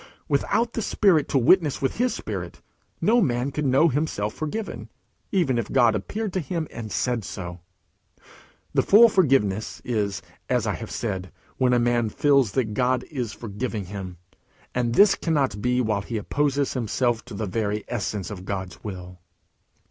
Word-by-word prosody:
Without 235 0 +1
the 230 - -2
Spirit 185 -8 +3
to - - +2
witness 150 +4 +4
with 135 - -1
his 250 +2 +2
spirit, - - -5 0.4
no 235 +2 +4
man 125 - 0
could 150 0 -1
know 135 +5 +5
himself 135 -8 -1
forgiven, 200 +8 -5 0.4
even 155 - +2
if 115 - -4
God 120 -4 +4
appeared 205 - -3
to 190 - 0
him 165 0 -3
and 110 -2 -7
said 120 -3 0
so. 90 -2 -7 1.1
The - - +4
full 230 +3 +7
forgiveness 130 - +1
is, 105 -5 -1 0.3
as - - +1
I - - 0
have - - -7
said, 95 -1 -4 0.3
when 130 -1 +3
a 125 - +4
man 120 -1 +2
feels 135 -3 +3
that 115 -5 0
God 125 +2 +1
is 125 -7 -3
forgiving 110 -1 -4
him; 95 -2 -7 0.6
and 120 -1 0
this 200 0 +7
cannot 140 - 0
be 125 +2 +2
while 110 -4 0
he 115 +3 -4
opposes 140 +5 0
himself 120 -1 0
to 120 -4 -9
the 110 - -2
very 105 +1 -2
essence 105 -3 -3
of 95 -3 -7
God's 95 -2 -5
will. 90 -3 -7
125 Hz, 165 wpm, -24 LUFS, 105-145 Hz, 1.1 s, full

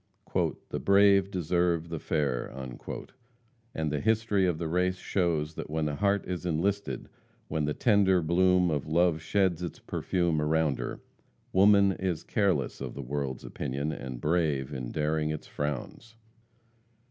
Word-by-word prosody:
"The - - -3
brave 100 -1 +5
deserve 85 -2 0
the 80 -2 -4
fair," 70 -6 -1 1.3
and 80 -2 -1
the 75 - -1
history 110 -3 +2
of 85 -3 0
the 80 - -3
race 90 +3 +1
shows 85 -5 0
that - - -7
when 80 0 -1
the 75 -1 -2
heart 100 +3 +1
is 90 -1 -4
enlisted, 95 +4 -1 0.4
when 75 -2 0
the 75 - -1
tender 100 -6 +3
bloom 90 +1 +3
of 75 -1 -2
love 85 0 +2
sheds 90 0 +1
its 85 -3 -5
perfume 85 -4 -1
around 75 -2 +1
her, - - -5 0.5
woman 100 +1 +6
is 90 -4 -2
careless 95 - 0
of - - -5
the 70 - -5
world's 70 0 -3
opinion, 70 +2 -3
and 65 -4 -6
brave 75 -4 0
in 65 -3 -4
daring 75 0 0
its 75 -1 -4
frowns. 75 - -5
85 Hz, 145 wpm, -29 LUFS, 75-95 Hz, 1.3 s, woman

